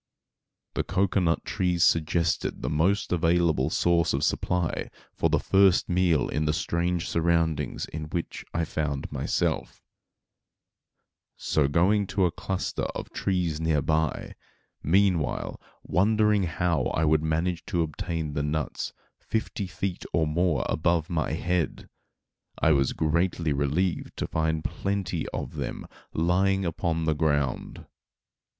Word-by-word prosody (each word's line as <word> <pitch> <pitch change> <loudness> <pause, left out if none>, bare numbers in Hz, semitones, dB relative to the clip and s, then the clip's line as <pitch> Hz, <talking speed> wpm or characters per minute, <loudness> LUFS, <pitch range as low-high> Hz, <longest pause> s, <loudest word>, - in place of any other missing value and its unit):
The - - 0
cocoanut 90 -3 +1
trees 90 -4 +1
suggested 85 +1 +1
the 65 - -1
most 90 +7 +1
available 85 -4 +2
source 85 0 +2
of 70 +2 0
supply 90 0 0 0.2
for - - +1
the - - +3
first 95 -1 +3
meal 90 -3 +2
in 75 +1 -1
the 75 - +2
strange 85 0 -1
surroundings 85 -2 0
in 75 0 -6
which 85 +2 -4
I 85 -1 0
found 75 -3 -3
myself; - - -1 1.6
so 75 -3 +1
going 95 +7 +2
to 95 -1 +1
a 85 - +1
cluster 95 +2 -3
of - - -5
the - - -25
trees 90 -5 -1
near 80 -3 +1
by, 80 -1 0 0.5
meanwhile 90 -3 +1 0.2
wondering 105 +1 +3
how 85 -4 0
I 80 - +1
would 80 0 +3
manage 80 +2 -1
to 90 -5 +1
obtain 80 0 -4
the 70 - -1
nuts 75 +1 -2 0.3
fifty 110 -3 -3
feet 90 0 -4
or 80 -2 +3
more 80 0 +1
above 85 +1 +1
my 80 -2 0
head, 85 +1 -1 0.7
I 80 - +3
was 70 -3 +2
greatly 80 0 +1
relieved 75 +6 -1
to - - -1
find 80 0 -1
plenty 95 -4 -2
of - - -5
them - - -4 0.3
lying 95 +3 +2
upon 80 -1 -1
the 80 - +2
ground. 75 -4 -1
85 Hz, 130 wpm, -27 LUFS, 80-90 Hz, 1.6 s, the